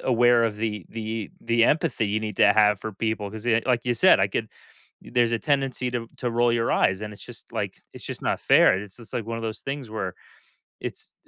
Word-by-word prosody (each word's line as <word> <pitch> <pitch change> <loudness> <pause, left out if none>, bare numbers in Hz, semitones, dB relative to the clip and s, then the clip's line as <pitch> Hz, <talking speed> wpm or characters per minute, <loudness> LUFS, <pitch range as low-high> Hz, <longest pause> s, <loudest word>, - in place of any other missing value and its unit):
aware 120 -1 +4
of 110 -2 -1
the 105 -3 -3
the 110 -1 -5
the 115 0 +2
empathy 135 -7 +1
you 105 +2 -1
need 105 -2 -5
to 105 - +6
have 105 -2 +4
for 110 - -5
people, 105 0 -2
'cause 110 +1 -9
y 115 -1 +3
like 125 -2 +1
you 120 -1 +1
said, - - +5
I - - +4
could - - -3 0.5
there's 120 -1 +1
a 115 - +1
tendency 135 -2 0
to 120 -2 -3
to 125 - -2
roll 120 +1 +2
your 115 0 +1
eyes, 95 +1 +2
and 105 0 -6
it's 105 - -12
just, - - -11
like - - -3 0.2
it's - - -11
just - - -6
not - - -1
fair. - - +5
It 95 - -4
is 100 -2 -11
just 115 -2 -12
like 120 -3 -2
one 115 0 -3
of - - -7
those 110 -1 -4
things 135 -3 -5
where 95 -5 -4 0.7
it's, - - -7
115 Hz, 240 wpm, -25 LUFS, 105-120 Hz, 0.7 s, to